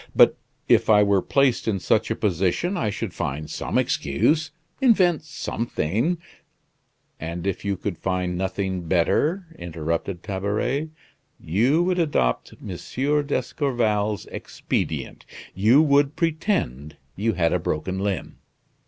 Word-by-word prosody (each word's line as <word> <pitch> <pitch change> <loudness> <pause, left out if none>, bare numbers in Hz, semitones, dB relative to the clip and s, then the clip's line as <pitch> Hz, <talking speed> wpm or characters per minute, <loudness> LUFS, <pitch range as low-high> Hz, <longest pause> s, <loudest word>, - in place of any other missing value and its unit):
But - - +7 0.3
if - - +4
I 105 -1 +7
were 100 -2 +3
placed 135 0 +2
in 100 -3 +1
such - - +1
a - - 0
position 95 - 0
I 165 - 0
should 105 -2 -4
find 75 -3 -3
some - - -3
excuse 150 - +1 0.3
invent 190 - +4
something 120 - -2 0.5
" - - -46 0.3
"And 85 +2 -5
if 100 -2 -2
you 100 -2 -1
could 95 -3 -4
find 90 -1 -1
nothing 95 -1 -2
better," 150 - +2
interrupted 85 +2 -3
Tabaret, 105 +10 -1 0.5
"you 125 - +2
would 180 0 +1
adopt 105 - 0
M. - - -9 0.6
d'Escorval's 115 - 0
expedient; - - -3 0.3
you 115 - +5
would 145 -1 +3
pretend 160 - -1 0.2
you 110 +3 0
had 85 -2 +1
broken 90 +4 -2
a - - -3
limb. 100 -4 -3
105 Hz, 125 wpm, -24 LUFS, 90-145 Hz, 0.6 s, But